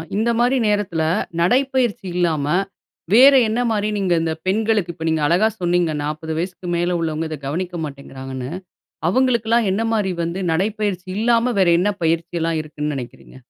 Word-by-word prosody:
இந்த 225 +3 +1
மாரி 250 +2 +3
நேரத்துல 200 -6 0 0.4
நடைப்பயிற்சி 245 +1 +1
இல்லாம, 160 -5 +1 0.7
வேற 265 +5 +8
என்ன 220 +3 -1
மாரி 210 0 0
நீங்க 190 -3 +1
இந்த 160 -1 -1
பெண்களுக்கு. 210 -2 +1
இப்ப 160 -1 -7
நீங்க 160 -1 0
அழகா 180 +7 +3
சொன்னீங்க 175 -2 +1
40 155 +2 -4
வயசுக்கு 180 +1 -4
மேலே 175 +1 0
உள்ளவங்க, 160 -1 -2
இத 155 - -5
கவனிக்க 175 +4 -3
மாட்டேன்கிறாங்கன்னு. 135 -2 -7 0.6
அவங்களுக்குலாம் 235 -2 +2
என்ன 220 +4 0
மாரி 200 -4 0
வந்து 170 +3 -3
நடைப்பயிற்சி 200 0 -1
இல்லாம 235 +2 +2
வேற 185 - +4
என்ன 205 +3 +2
பயிற்சிலாம் 165 0 0
இருக்குன்னு 150 -1 -4
நினைக்கிறீங்க? 125 0 -9
180 Hz, 145 wpm, -20 LUFS, 160-220 Hz, 0.7 s, வேற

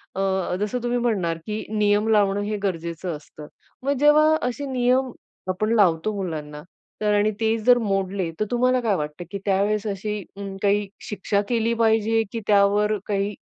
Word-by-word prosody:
अ, 190 -1 0
जसं 235 +4 -2
तुम्ही 245 0 0
म्हणणार 190 -9 0
की 215 0 -3
नियम 210 +1 +2
लावणं 205 -2 +3
हे 210 +1 -2
गरजेचं 170 -2 -3
असतं, 150 0 -13 0.4
मग 275 - +1
जेव्हा 305 +1 +5
असे 250 +4 -4
नियम 255 +1 +2 0.4
आपण 215 +5 0
लावतो 195 0 +3
मुलांना 155 -6 -5 0.4
तर 210 -1 +2
आणि 205 +1 +3
तेच 225 0 +1
जर 245 -1 +7
मोडले, 195 -4 -1
तर 215 - +1
तुम्हाला 250 +1 +2
काय 215 -4 +1
वाटतं 150 +2 -4
की 200 - -3
त्यावेळेस 205 +2 +1
अशी 210 +1 -3 0.4
काही 205 0 +2 0.2
शिक्षा 200 0 0
केली 230 -1 +1
पाहिजे 225 0 +2
की 230 - -3
त्यावर 205 +1 +3
काही 200 0 -1
210 Hz, 160 wpm, -23 LUFS, 195-225 Hz, 0.4 s, जर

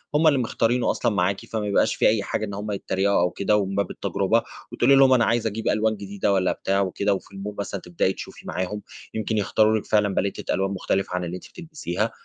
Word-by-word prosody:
هُم 160 +2 +4
اللي 140 -3 +4
مختارينه 120 0 +1
أصلًا - - 0
معاكِ، 100 0 0
فما 110 -2 -3
يبقاش 100 - +2
في - - +3
أي 105 -2 +2
حاجة 110 - -2
إن 100 - -7
هُم 105 +1 -4
يتريقوا 100 -1 +1
أو 90 0 +2
كده 105 +1 +1
ومن 100 -1 -1
باب 100 -2 0
التجربة. - - 0 0.3
وتقولي 140 - +4
لهم: 135 -1 +6
"أنا 120 -3 +4
عايزة 115 -1 +1
أجيب 110 +2 -5
ألوان 110 0 +1
جديدة،" 100 0 -1
والّا 95 -1 +2
بتاع 100 0 0
وكده. 100 +1 0
وفي 95 - -5
الmall 100 +2 -5
مثلًا 100 -1 -4
تبدئي 90 +2 0
تشوفي - - -10
معاهم 95 +3 -3 0.3
يمكن 110 0 -1
يختاروا 110 +2 +3
لِك 105 - -5
فعلًا 105 -2 +2
باليتة 100 +1 -1
ألوان 95 0 0
مختلفة 95 -1 -1
عن 90 - -1
اللي 85 +1 -4
أنتِ 90 - -10
بتلبسيها، 145 - -4
100 Hz, 220 wpm, -24 LUFS, 95-110 Hz, 0.3 s, لهم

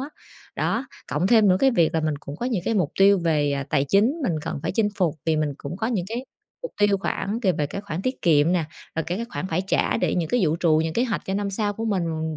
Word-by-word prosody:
á, 275 - -5 0.5
đó. 245 +4 -1 0.2
Cộng 155 +6 +1
thêm 220 -2 +5
những 185 - +4
cái 270 +4 +4
việc 170 -10 +2
là 160 - +2
mình 155 -1 0
cũng 140 +1 -8
có 240 - -3
những 220 -9 -1
cái 225 - 0
mục 180 -8 +1
tiêu 200 0 +6
về, 150 -3 +2
ờ, 140 0 -1
tài 135 - +2
chính 205 - +3
mình 185 - +1
cần 140 - -4
phải - - -2
chinh 210 +2 +2
phục, 175 -5 +1
vì 160 - +2
mình 150 -2 -1
cũng 150 +5 -6
có 220 - -2
những 215 -7 -1
cái 240 +4 -4 0.4
mục - - -6
tiêu 205 -1 +4
khoảng 205 +3 -2
c - - -16
về 150 - +1
cái 200 - -5
khoản 185 -3 -5
tiết 255 +4 -3
kiệm 160 -1 +4
nè, 175 -3 +1 0.3
rồi, 160 - +1
kiểu, 180 +4 -2
các 235 - -4
khoản 185 - -4
phải 170 +3 0
trả - - +1
để 180 -4 0
những 165 -3 -1
cái 245 - +1
dự 170 - +3
trù 160 -2 +4
những 160 - -2
kế 240 - +1
hoạch 225 -4 -2
cho 190 - -3
năm 200 0 -1
sau 205 +1 -1
của 225 +2 -5
mình 165 -6 -1
185 Hz, 285 wpm, -24 LUFS, 160-215 Hz, 0.5 s, tiêu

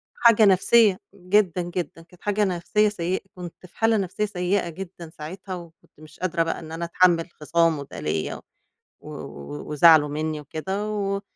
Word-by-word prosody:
حاجة 230 -2 +5
نفسيّة 195 +1 +5 0.2
جدًا 185 -1 +1
جدًا 175 -1 -5
كانت 180 +1 -22
حاجة 205 0 +1
نفسيّة 195 +4 +1
سيئة 185 -2 -2
كنت 180 0 -10
في - - -28
حالة 225 0 +3
نفسيّة 195 +1 -1
سيئة 185 -2 -1
جدًا 170 -1 -9
ساعتها، 185 +5 -7
وكنت 170 -4 -14
مش 155 - -15
قادرة 170 -2 0
بقى 165 - -3
إن 160 -1 -10
أنا 170 +1 -3
أتحمّل 170 0 +3
خصامه 160 -1 +1
ده - - -7
ليَّ 75 +1 -2
و - - -10 1.3
وزعله 155 0 +6
منّي 155 +1 -3
وكده 190 +8 -4
و 200 -1 -2
180 Hz, 160 wpm, -24 LUFS, 165-195 Hz, 1.3 s, وزعله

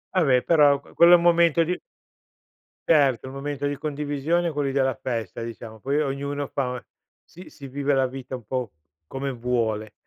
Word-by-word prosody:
Va 185 - +4
beh, 130 -3 +4
però, 145 -4 +4
qu - - -19
quello 170 +1 +7
è - - +11
un 170 - +3
momento 170 -1 +4
di 180 +2 -2 1.1
Certo, 140 -5 +3
un 130 - -8
momento 145 0 -3
di 145 -1 -3
condivisione 150 +3 -1
quelli 145 -2 -1
della 135 -2 +1
festa, 115 -3 -4
diciamo. 115 -1 -9
Poi 140 +6 0
ognuno 140 0 -3
fa 125 -3 -3 0.4
si 180 +2 -14
si 140 -2 -11
vive 140 +2 -1
la 135 -1 +2
vita 130 0 -7
un 125 - -9
po' 125 0 -3 0.3
come 135 - -4
vuole. 115 -3 -2
140 Hz, 180 wpm, -24 LUFS, 125-150 Hz, 1.1 s, è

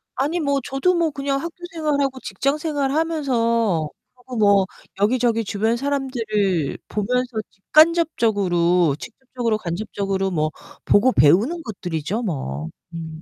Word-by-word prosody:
아니 305 +6 0
뭐 280 -2 +1
저도 310 +7 +1
뭐 330 -2 +1
그냥 275 -1 -1
학교 335 +1 -6 0.2
생활하고 285 -4 0
직장 275 +9 -1
생활 290 -4 -1
하면서 235 - +1 0.5
뭐 200 -2 +5 0.3
여기저기 230 +1 +2
주변 220 +4 0
사람들을 225 - -1
보면서 245 +3 -1
직간접적으로 195 - +3
직접적으로 245 -2 -3
간접적으로 195 +1 -2
뭐 155 -2 0 0.4
보고 245 +6 +4
배우는 225 - +4
것들이죠, 185 +1 -3
뭐. 80 - -3 0.2
음. 160 -1 -7
230 Hz, 285 characters per minute, -22 LUFS, 190-275 Hz, 0.5 s, 뭐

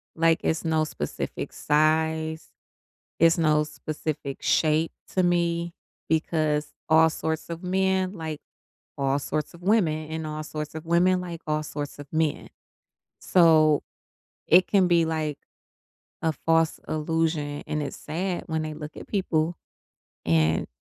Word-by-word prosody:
Like, 165 0 +3
it's 160 +1 0
no 160 -1 +2
specific 75 - -4
size, 160 +1 +1 0.7
it's 165 +1 +5
no 155 -2 +3
specific 150 -2 -5
shape 155 +1 +2 0.2
to 185 - +3
me 170 -1 +1 0.4
because 155 -2 0 0.2
all 160 +1 +6
sorts 160 0 -3
of 170 +2 -6
men 190 0 +1
like 160 -5 -6 0.6
all 135 0 +1
sorts 150 +3 -3
of 170 - -14
women 175 -6 +2
and 160 0 -4
all 155 0 -4
sorts 155 0 -6
of 160 0 -6
women 180 +2 +3
like 175 -2 -7
all 155 0 0
sorts 145 -1 -6
of 145 - -8
men, 160 -2 0 0.7
so, 155 -4 +5 0.7
it 180 +3 +6
can 195 -3 +4
be, 170 -2 +4
like, 155 -2 -2 0.8
a 160 - +1
false 165 +2 +1
illusion, 155 -2 -1
and 150 0 -2
it's 145 - -5
sad 175 +4 -3
when 160 -1 -1
they 155 0 -4
look 150 0 -8
at - - -9
people 170 -4 0 0.7
and 80 -1 +2
160 Hz, 140 wpm, -26 LUFS, 155-170 Hz, 0.8 s, all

